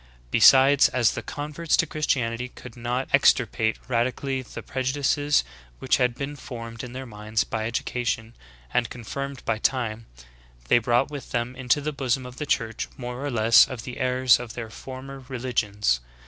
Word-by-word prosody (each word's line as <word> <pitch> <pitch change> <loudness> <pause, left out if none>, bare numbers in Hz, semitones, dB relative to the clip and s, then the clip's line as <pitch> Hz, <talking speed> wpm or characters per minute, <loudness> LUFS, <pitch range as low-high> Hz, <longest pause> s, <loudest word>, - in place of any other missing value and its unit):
Besides, 135 +1 +7
as 120 -3 +2
the - - -4
converts 150 +3 -2
to - - +3
Christianity 125 -5 -1
could 125 -1 -12
not 120 +2 -2
extirpate 110 0 +3
radically 130 +2 -1
the 125 - -9
prejudices 140 - +1 0.3
which 130 - +2
had 125 -2 +1
been 140 +2 -5
formed 115 -3 -8
in 125 -1 -8
their 130 +1 -6
minds 110 -1 -2
by 110 0 -3
education, 115 -1 -2 0.4
and 120 -2 +1
confirmed 140 +3 -6
by 110 -1 0
time, 115 -3 -1 0.6
they - - +6
brought 120 +4 +1
with 140 -4 -7
them 120 +1 -2
into 130 +2 +1
the 150 +1 -3
bosom 130 -2 -1
of 125 0 -10
the 150 - -4
church 115 -4 -1
more 125 +1 -6
or 145 - -1
less 115 -2 +6
of 125 -4 -7
the 125 +1 -7
errors 130 -1 +4
of 120 -2 -8
their 115 -2 -6
former 135 +3 -8
re 130 0 -7
ligions. 105 - 0
125 Hz, 170 wpm, -25 LUFS, 115-135 Hz, 0.6 s, Besides